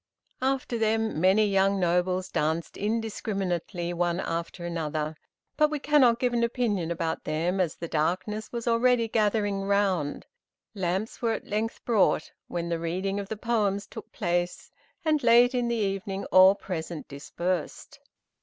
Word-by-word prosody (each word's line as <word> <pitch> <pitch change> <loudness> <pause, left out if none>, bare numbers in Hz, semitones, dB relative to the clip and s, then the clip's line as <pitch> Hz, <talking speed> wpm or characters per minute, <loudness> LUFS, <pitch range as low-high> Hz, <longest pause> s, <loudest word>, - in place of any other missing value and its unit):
After 260 -3 -1
them, 220 -5 0
many 195 +4 +5
young 195 0 +2
nobles 180 +1 +1
danced 160 +2 -1
indiscriminately, 195 -5 -2
one 175 0 0
after 170 0 -4
another, 155 -2 -3 0.4
but 305 0 +4
we 300 - -2
cannot 270 -5 +4
give 245 0 0
an 235 -1 +1
opinion 230 -8 0
about 165 -1 -2
them 170 +5 -1
as 170 -4 -1
the 170 - -6
darkness 185 +8 -1
was 235 0 -5
already 235 0 +3
gathering 210 -2 +1
round. 195 -7 0 0.5
Lamps 190 +2 -2
were 230 -2 +1
at - - -5
length 215 +2 -3
brought, 225 -5 +2 0.2
when 170 -1 -3
the 170 -1 -1
reading 185 +4 -2
of 200 -1 -6
the 220 - -4
poems 205 -3 0
took - - -10
place, 175 -3 -2 0.3
and 305 -2 +2
late 240 +1 +5
in 245 -1 0
the 235 - 0
evening 195 -2 -2
all 185 +1 +8
present 170 -4 -5
dispersed. 170 +4 -4
195 Hz, 150 wpm, -27 LUFS, 175-225 Hz, 0.5 s, all